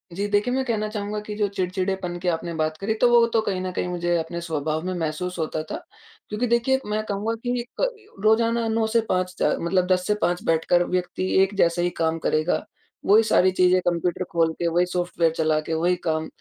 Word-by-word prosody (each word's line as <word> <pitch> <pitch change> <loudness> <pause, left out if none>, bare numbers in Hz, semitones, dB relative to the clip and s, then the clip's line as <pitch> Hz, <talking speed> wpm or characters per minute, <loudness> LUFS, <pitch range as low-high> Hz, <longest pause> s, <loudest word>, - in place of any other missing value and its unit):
जी, 200 +4 -2
देखिए, 205 +4 +1
मैं 265 +1 +1
कहना 220 -3 -1
चाहूँगा 210 0 -3
कि 210 - -5
जो 210 -1 +1
चिड़चिड़ेपन 185 -1 -2
की 180 - -5
आपने 170 0 -1
बात 155 -1 -1
करी, 200 +5 -1
तो 240 +3 +3
वो 240 -1 +6
तो 225 - +4
कहीं 195 -3 -2
न 185 0 -3
कहीं 180 - -2
मुझे 175 -1 -1
अपने 165 +1 -4
स्वभाव 155 -1 -2
में 185 - -2
महसूस 175 +1 -3
होता 155 0 -2
था। 155 - -6 0.5
क्योंकि 215 +4 -1
देखिए, 235 +3 +2
मैं 215 +1 -1
कहूँगा 205 +3 -1
कि 245 0 0 0.2
क - - +3 0.4
रोज़ाना 230 +1 +3
9 225 0 +1
से 230 +1 +2
5 185 0 0
च - - +3
मतलब 180 +2 +1
10 180 -1 +2
से 210 - +3
5 175 +1 0
बैठकर 165 +2 +3
व्यक्ति 185 +1 -2 0.2
एक 195 +1 -1
जैसा 170 -1 +3
ही 175 - +1
काम 165 0 +1
करेगा, 155 +3 +1 0.4
वही 215 +3 +6
सारी 185 -3 +4
चीज़ें, 185 0 +4
कंप्यूटर 175 +1 0
खोल 165 -1 +2
के, 170 - -2
वही 175 +2 +2
सॉफ्टवेयर 175 -2 0
चला 155 -1 +2
के, 155 +1 -4
वही 175 +3 +2
काम, 160 0 0
180 Hz, 215 wpm, -24 LUFS, 170-210 Hz, 0.5 s, वो